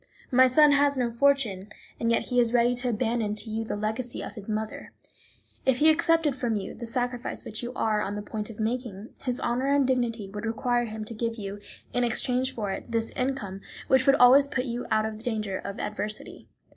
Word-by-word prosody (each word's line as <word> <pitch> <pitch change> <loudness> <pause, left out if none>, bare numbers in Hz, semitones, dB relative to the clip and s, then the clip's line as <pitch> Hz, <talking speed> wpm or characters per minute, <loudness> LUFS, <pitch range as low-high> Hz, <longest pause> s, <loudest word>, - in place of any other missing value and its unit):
My 260 +1 +6
son 295 +3 +6
has 285 0 +3
no 245 -2 0
fortune, 235 -7 +1 0.3
and 230 - 0
yet 230 - +2
he 245 -1 +2
is 235 -1 +2
ready 240 +1 +4
to 245 0 0
abandon 225 -2 0
to 215 +1 -3
you 225 +1 -2
the 220 - -4
legacy 220 +4 -3
of - - -7
his 210 -1 -6
mother. 215 0 -4 0.7
If 265 -2 +2
he 310 +4 +6
accepted 330 -3 +2
from 240 -4 -1
you 195 -2 -4
the 235 - -7
sacrifice 245 +1 -3
which 220 - -2
you 240 0 -4
are 215 -3 +1
on 205 0 -3
the 205 - -5
point 210 0 -5
of 225 - -10
making, 220 -2 -3
his 250 -1 -2
honour 245 +3 -1
and 280 -1 +4
dignity 240 -5 0
would 205 +3 -5
require 240 +1 0
him 220 -1 -6
to 230 - -3
give 230 +1 -2
you, 200 -2 -6 0.3
in 245 - +1
exchange 250 +2 +1
for 205 -4 -2
it, 195 - -6
this 225 -1 0
income, 250 -8 -3 0.3
which 265 0 +3
would 275 - +7
always 270 +2 +7
put 265 -2 -2
you 240 -1 -4
out 215 0 +2
of 220 0 -5
danger 215 -5 -2
of 200 0 -6
adversity. 210 0 -4
235 Hz, 215 wpm, -27 LUFS, 215-255 Hz, 0.7 s, would